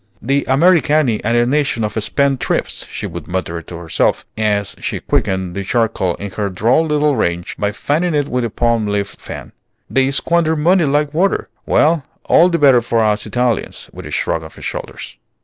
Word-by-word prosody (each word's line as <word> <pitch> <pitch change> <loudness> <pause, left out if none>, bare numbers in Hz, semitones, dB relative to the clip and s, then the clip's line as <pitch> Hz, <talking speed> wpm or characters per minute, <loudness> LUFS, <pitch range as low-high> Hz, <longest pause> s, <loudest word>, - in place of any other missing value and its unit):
"The 140 +4 0
Americani 150 -4 +3
are 115 +2 +1
a 120 0 +4
nation 140 -3 0
of 105 0 -2
spend 140 +2 +1
thrifts," - - -2
she - - -5
would - - -7
mutter 85 -2 -3
to 85 +1 -9
herself, 85 -2 0
as 105 -3 0
she - - -3
quickened 95 -2 -1
the 100 +1 -4
charcoal 105 -4 0
in 100 -1 -7
her 100 0 -2
droll 115 - +2
little 150 -1 +2
range 85 -5 -2
by 100 0 0
fanning 155 +10 -1
it 145 -1 +1
with 125 -2 -1
a 115 - -1
palm 115 -1 0
leaf 100 -1 -1
fan; - - -9 0.4
"they 135 0 +2
squander 160 +3 +1
money 170 +3 +3
like 145 +1 +1
water. 185 +5 +1 0.2
Well, 155 -1 +3 0.2
all 175 - +5
the 170 - +1
better 135 -5 +5
for 115 0 0
us 105 -1 0
Italians!" 120 -3 -2
with - - -9
a - - -9
shrug 80 - -1
of 80 - -11
her - - -13
shoulders. - - -6
120 Hz, 190 wpm, -17 LUFS, 105-150 Hz, 0.4 s, all